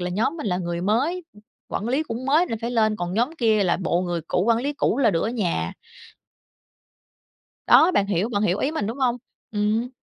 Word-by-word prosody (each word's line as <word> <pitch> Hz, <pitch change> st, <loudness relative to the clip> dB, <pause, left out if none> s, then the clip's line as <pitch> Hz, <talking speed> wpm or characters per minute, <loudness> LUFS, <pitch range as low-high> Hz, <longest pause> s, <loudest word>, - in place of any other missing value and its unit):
là 180 Hz, 0 st, -3 dB
nhóm 220 Hz, -, 0 dB
mình 300 Hz, -, -5 dB
là 180 Hz, -2 st, 0 dB
người 170 Hz, -1 st, -3 dB
mới, 275 Hz, -, 0 dB, 0.4 s
quản 215 Hz, -, -3 dB
lý 270 Hz, +6 st, +1 dB
cũng 245 Hz, -2 st, -6 dB
mới 310 Hz, +6 st, +3 dB
nên 225 Hz, -, -4 dB
phải 235 Hz, -, -3 dB
lên, 220 Hz, -3 st, +2 dB
còn 175 Hz, -1 st, -4 dB
nhóm 240 Hz, +7 st, +1 dB
kia 220 Hz, -4 st, +3 dB
là 175 Hz, -, +2 dB
bộ 175 Hz, -2 st, 0 dB
người 175 Hz, -2 st, -2 dB
cũ, 180 Hz, -, +1 dB
quản 230 Hz, -1 st, +3 dB
lý 285 Hz, +4 st, -2 dB
cũ 280 Hz, -3 st, 0 dB
là 235 Hz, -6 st, +4 dB
được 165 Hz, -2 st, 0 dB
ở -, -, 0 dB
nhà. 175 Hz, -, -1 dB, 1.9 s
Đó, 335 Hz, -, +7 dB
bạn 200 Hz, -, +2 dB
hiểu 200 Hz, +2 st, 0 dB
bạn 205 Hz, -3 st, -1 dB
hiểu 195 Hz, -1 st, +1 dB
ý 275 Hz, -, 0 dB
mình, 265 Hz, -11 st, -2 dB
đúng 235 Hz, +5 st, -5 dB
hông? 250 Hz, -2 st, +1 dB, 0.3 s
Ừm. 215 Hz, +3 st, 0 dB
220 Hz, 220 wpm, -23 LUFS, 185-250 Hz, 1.9 s, Đó